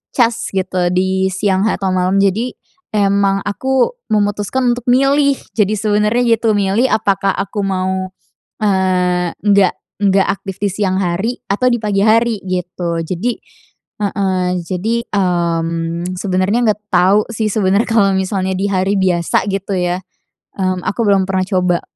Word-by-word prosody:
cas 235 Hz, -2 st, +1 dB
gitu 185 Hz, -2 st, 0 dB
di 190 Hz, +1 st, +1 dB
siang 190 Hz, +1 st, 0 dB
atau 195 Hz, -3 st, -1 dB
malam. 185 Hz, +1 st, +1 dB
Jadi 220 Hz, +6 st, 0 dB, 0.4 s
emang 200 Hz, -1 st, +2 dB
aku 265 Hz, -, 0 dB, 0.2 s
memutuskan 210 Hz, +4 st, +1 dB
untuk 245 Hz, -1 st, -9 dB
milih. 275 Hz, +2 st, +3 dB, 0.2 s
Jadi 210 Hz, -2 st, +1 dB
sebenernya 210 Hz, +3 st, +1 dB
gitu 225 Hz, -1 st, +1 dB
milih 205 Hz, +6 st, +1 dB
apakah 195 Hz, -2 st, +1 dB
aku 200 Hz, +1 st, -3 dB
mau, 190 Hz, 0 st, -1 dB, 0.5 s
eee, 180 Hz, -3 st, +1 dB
nggak 200 Hz, -3 st, +3 dB, 0.3 s
nggak 195 Hz, -1 st, +3 dB
aktif 195 Hz, -1 st, -8 dB
di 205 Hz, -, +2 dB
siang 190 Hz, -1 st, 0 dB
hari 190 Hz, +7 st, -1 dB
atau 230 Hz, +6 st, +2 dB
di 240 Hz, -, +1 dB
pagi 200 Hz, -2 st, +1 dB
hari, 225 Hz, -1 st, +3 dB
gitu. 175 Hz, -2 st, -3 dB
Jadi 185 Hz, +9 st, -2 dB, 0.7 s
heeh, 190 Hz, -2 st, 0 dB
jadi, 185 Hz, +6 st, -2 dB
mmm, 170 Hz, -2 st, -1 dB
sebenernya 190 Hz, +3 st, +1 dB
nggak 210 Hz, 0 st, +1 dB
tahu 190 Hz, +4 st, +4 dB
sih 220 Hz, -1 st, -1 dB
sebenernya 200 Hz, +1 st, +1 dB
kalau 210 Hz, -4 st, +3 dB
misalnya 190 Hz, 0 st, -1 dB
di 195 Hz, +2 st, -1 dB
hari 190 Hz, 0 st, 0 dB
biasa 185 Hz, +1 st, +1 dB
gitu 195 Hz, +1 st, -3 dB
ya, 180 Hz, 0 st, 0 dB, 0.6 s
mmm, 185 Hz, -1 st, -1 dB
aku 220 Hz, -, -2 dB
belum 195 Hz, -2 st, +3 dB
pernah 185 Hz, -1 st, 0 dB
coba. 180 Hz, -2 st, +1 dB
195 Hz, 140 wpm, -16 LUFS, 185-210 Hz, 0.7 s, tahu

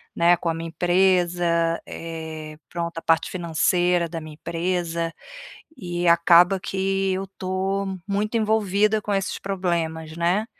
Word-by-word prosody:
né, 170 Hz, +1 st, +4 dB
com 175 Hz, -, -5 dB
a 165 Hz, -, +2 dB
minha 165 Hz, +1 st, -5 dB
empresa, 175 Hz, -1 st, +2 dB
eh, 160 Hz, -2 st, -7 dB
pronto, 170 Hz, -1 st, -4 dB
a -, -, -3 dB
parte 165 Hz, 0 st, +1 dB
financeira 175 Hz, 0 st, +1 dB
da 165 Hz, -1 st, -6 dB
minha 155 Hz, -1 st, -10 dB
empresa, 170 Hz, 0 st, -2 dB, 0.7 s
e 175 Hz, -1 st, -2 dB
acaba 170 Hz, +3 st, +6 dB
que 195 Hz, +1 st, -1 dB
eu 190 Hz, +1 st, -2 dB
estou 190 Hz, +1 st, -3 dB
muito 210 Hz, +3 st, -1 dB
envolvida 215 Hz, -1 st, +2 dB
com 205 Hz, -1 st, -2 dB
esses 195 Hz, -1 st, -1 dB
problemas, 170 Hz, -4 st, -2 dB
né? 180 Hz, +6 st, +1 dB
175 Hz, 135 wpm, -23 LUFS, 165-190 Hz, 0.7 s, acaba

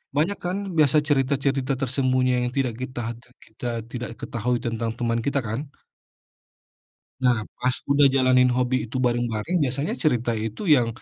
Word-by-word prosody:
Banyak 165 Hz, +8 st, +1 dB
kan, 180 Hz, +2 st, -1 dB, 0.2 s
biasa 155 Hz, -1 st, +5 dB
cerita-cerita 135 Hz, -1 st, +1 dB
tersembunyi 130 Hz, -1 st, +1 dB
yang 125 Hz, 0 st, 0 dB
tidak 130 Hz, -4 st, +1 dB
kita 130 Hz, -1 st, -5 dB, 0.2 s
tidak 125 Hz, 0 st, -23 dB
kita 110 Hz, +3 st, -7 dB, 0.2 s
tidak 125 Hz, -1 st, -4 dB
ketahui 120 Hz, +1 st, -1 dB
tentang 115 Hz, -1 st, -1 dB
teman 115 Hz, -1 st, 0 dB
kita, 140 Hz, 0 st, +1 dB
kan? 110 Hz, +3 st, -2 dB, 1.6 s
Nah, 125 Hz, -2 st, +4 dB, 0.2 s
pas 125 Hz, -, +3 dB, 0.2 s
udah 140 Hz, 0 st, +6 dB
jalanin 130 Hz, -1 st, +5 dB
hobi 125 Hz, +1 st, +1 dB
itu 120 Hz, +3 st, -5 dB
bareng-bareng, 120 Hz, +5 st, -1 dB
biasanya 140 Hz, -, -1 dB
cerita 120 Hz, -6 st, +2 dB
itu 110 Hz, -, -4 dB
yang 120 Hz, -3 st, +2 dB
125 Hz, 145 wpm, -24 LUFS, 120-135 Hz, 1.6 s, udah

